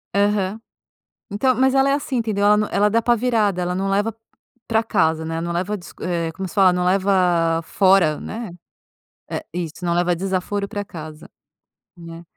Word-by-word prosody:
Aham, 200 0 +1 0.7
então, 255 +6 +1
mas 260 +2 +2
ela 270 0 +4
é - - +3
assim 280 -2 -2
entendeu? 215 -4 0
Ela 210 0 +6
nã 210 0 0
ela 205 - +3
é - - +2
da 230 +2 +2
pá 240 +1 +3
virada, 220 -5 +1
ela 180 0 -1
não 195 +1 -1
leva 205 +3 0 0.5
pra 225 -1 +2
casa, 160 -7 +1
né, 165 0 -3
não 170 0 -3
leva 185 +5 -2
dis 175 - -12
eh, 170 -2 -2
como 190 +3 -5
se - - -12
fala? 190 -3 +5
Não 180 0 0
leva 180 -3 +2
fora, 185 -5 +3
né, 225 -2 -6 0.8
é, - - -4
isso, 175 0 -5
não 170 - 0
leva 175 0 +1
desaforo 195 +2 -2
pra 205 0 -5
casa, 155 -5 -10 0.7
né. 165 0 -10
195 Hz, 190 wpm, -21 LUFS, 175-210 Hz, 0.8 s, Ela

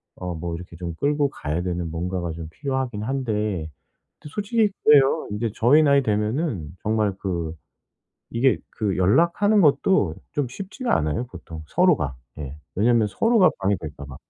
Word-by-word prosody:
어 90 -1 -5
뭐 85 +1 -4
이렇게 85 0 -10
좀 85 0 -5
끌고 145 - +1
가야 80 - -3
되는 90 -2 -2
뭔가가 85 +1 -3
좀 80 -1 -7
필요하긴 130 - -3
한데 105 -9 -2 0.5
또 - - -11
솔직히 210 +5 +1
그래요. 145 +1 +5
인제 105 +2 -2
저희 140 +7 +5
나이 140 -2 +4
되면은 105 - -1
정말 105 -2 +1
그 85 -4 -3 0.8
이게 125 +3 +3
그 105 -4 -2
연락하는 170 - +3
것도 155 +6 +3 0.2
좀 145 -3 0
쉽지가 200 - -2
않아요 75 +10 -1
보통 80 -7 -10
서로가. 155 - +2 0.2
예 70 -1 -6 0.2
왜냐면 115 +2 +3
서로가 225 - +4
방해될까 85 -7 -2
봐. 70 -2 -10
105 Hz, 310 characters per minute, -23 LUFS, 85-145 Hz, 0.8 s, 그래요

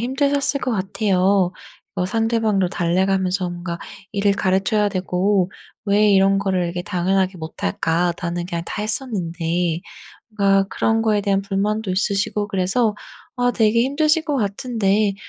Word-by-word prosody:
힘드셨을 280 +3 0
것 255 - -2
같아요. 195 -2 +1 0.4
뭐 180 -1 -1
상대방도 225 -3 +1
달래가면서 185 +1 0
뭔가 175 -1 -5 0.3
일을 200 0 +2
가르쳐야 195 +2 +1
되고 185 0 0 0.3
'왜 210 0 +3
이런 195 0 +4
거를 190 -2 0
이렇게 175 +1 -3
당연하게 185 0 0
못할까? 165 - -1
나는 175 0 -3
그냥 170 -2 -3
다 210 - -5
했었는데.' 175 -7 -1 0.6
뭔가 195 -1 +3
그런 225 0 +1
거에 215 -2 +2
대한 195 -1 +1
불만도 205 +1 -1
있으시고 205 +1 0
그래서 205 +3 +1 0.4
아 245 0 +2
되게 225 -1 +2
힘드실 305 +4 +2
것 295 -3 0
같은데 210 -2 0
195 Hz, 315 characters per minute, -21 LUFS, 180-215 Hz, 0.6 s, 이런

